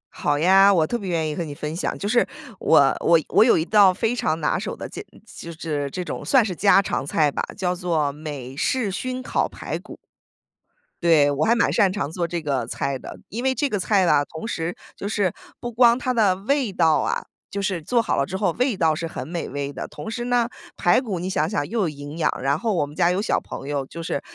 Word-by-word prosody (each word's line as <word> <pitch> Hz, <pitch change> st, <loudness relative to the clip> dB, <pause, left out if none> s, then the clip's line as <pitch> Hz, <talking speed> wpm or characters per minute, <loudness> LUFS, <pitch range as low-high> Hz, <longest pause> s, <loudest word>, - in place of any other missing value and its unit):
好 145 Hz, 0 st, 0 dB
呀， 195 Hz, +5 st, +6 dB
我 170 Hz, -5 st, +3 dB
特 240 Hz, -, -3 dB
别 200 Hz, -5 st, -4 dB
愿 165 Hz, -2 st, 0 dB
意 150 Hz, -, -3 dB
和 170 Hz, -, -2 dB
你 150 Hz, -3 st, -7 dB
分 150 Hz, +2 st, -5 dB
享。 170 Hz, -, -2 dB
就 200 Hz, -, -4 dB
是， 240 Hz, +3 st, +3 dB, 0.3 s
我 140 Hz, -4 st, +4 dB
我 170 Hz, -1 st, +4 dB
我 -, -, +6 dB
有 230 Hz, -, +5 dB
一 160 Hz, -, 0 dB
道 205 Hz, -2 st, +6 dB
非 225 Hz, +6 st, -1 dB
常 160 Hz, -8 st, -1 dB
拿 150 Hz, -, 0 dB
手 -, -, -4 dB
的 -, -, -7 dB
家 -, -, -8 dB, 0.2 s
就 170 Hz, -, -10 dB
是 150 Hz, -4 st, -3 dB
这 180 Hz, +5 st, -5 dB
种 -, -, -5 dB
算 260 Hz, -5 st, +4 dB
是 185 Hz, -, -3 dB
家 195 Hz, +3 st, +5 dB
常 195 Hz, -, -1 dB
菜 145 Hz, 0 st, +1 dB
吧， -, -, -2 dB, 0.2 s
叫 180 Hz, -3 st, 0 dB
做 165 Hz, -5 st, 0 dB
美 140 Hz, -3 st, -7 dB
式 220 Hz, -, 0 dB
熏 255 Hz, +6 st, -4 dB
烤 -, -, 0 dB
排 -, -, -5 dB
骨。 -, -, -12 dB, 1.1 s
对， 155 Hz, -4 st, +5 dB
我 140 Hz, +2 st, 0 dB
还 230 Hz, -, +4 dB
蛮 235 Hz, -, +2 dB
擅 200 Hz, -5 st, +4 dB
长 190 Hz, -6 st, -2 dB
做 170 Hz, +1 st, -2 dB
这 170 Hz, 0 st, -3 dB
个 135 Hz, -6 st, -1 dB
菜 135 Hz, +3 st, -3 dB
的。 -, -, -10 dB
因 230 Hz, +5 st, -5 dB
为 265 Hz, 0 st, +2 dB
这 285 Hz, +2 st, 0 dB
个 210 Hz, -, -1 dB
菜 195 Hz, 0 st, +2 dB
呢， 150 Hz, -4 st, +4 dB
同 160 Hz, +8 st, -8 dB
时 170 Hz, -5 st, -3 dB, 0.2 s
就 -, -, -8 dB
是 200 Hz, -5 st, 0 dB, 0.3 s
不 240 Hz, -, -4 dB
光 235 Hz, +1 st, +4 dB
它 255 Hz, 0 st, -1 dB
的 205 Hz, -6 st, +3 dB
味 255 Hz, +2 st, 0 dB
道 165 Hz, -4 st, +3 dB
啊 -, -, -1 dB, 0.3 s
就 200 Hz, -, -3 dB
是 190 Hz, -4 st, -1 dB
做 235 Hz, +8 st, +1 dB
好 225 Hz, -, -1 dB
了 140 Hz, -, +1 dB
之 190 Hz, +6 st, -4 dB
后 200 Hz, -, 0 dB
味 250 Hz, -4 st, +1 dB
道 160 Hz, -3 st, +2 dB
是 165 Hz, -, -4 dB
很 130 Hz, -5 st, -6 dB
美 170 Hz, +1 st, -4 dB
味 140 Hz, 0 st, -4 dB
的， -, -, -5 dB
同 220 Hz, -, -8 dB
时 240 Hz, +1 st, -4 dB
呢， 245 Hz, -1 st, +1 dB, 0.3 s
排 175 Hz, +8 st, +3 dB
骨 205 Hz, -8 st, -4 dB
你 180 Hz, +2 st, -3 dB
想 155 Hz, -4 st, 0 dB
想， 145 Hz, 0 st, -1 dB
又 230 Hz, -1 st, -1 dB
有 175 Hz, -, +1 dB
营 145 Hz, +1 st, -8 dB
养， 165 Hz, -, +2 dB
然 135 Hz, +2 st, +1 dB
后 225 Hz, -3 st, -1 dB
我 150 Hz, -, +1 dB
们 145 Hz, +1 st, -12 dB
家 170 Hz, -, +3 dB
有 185 Hz, +2 st, 0 dB
小 215 Hz, -, 0 dB
朋 135 Hz, -, -8 dB
友， 140 Hz, -2 st, -2 dB
就 165 Hz, +5 st, -8 dB
是 140 Hz, -, -3 dB
175 Hz, 265 characters per minute, -23 LUFS, 150-215 Hz, 1.1 s, 呀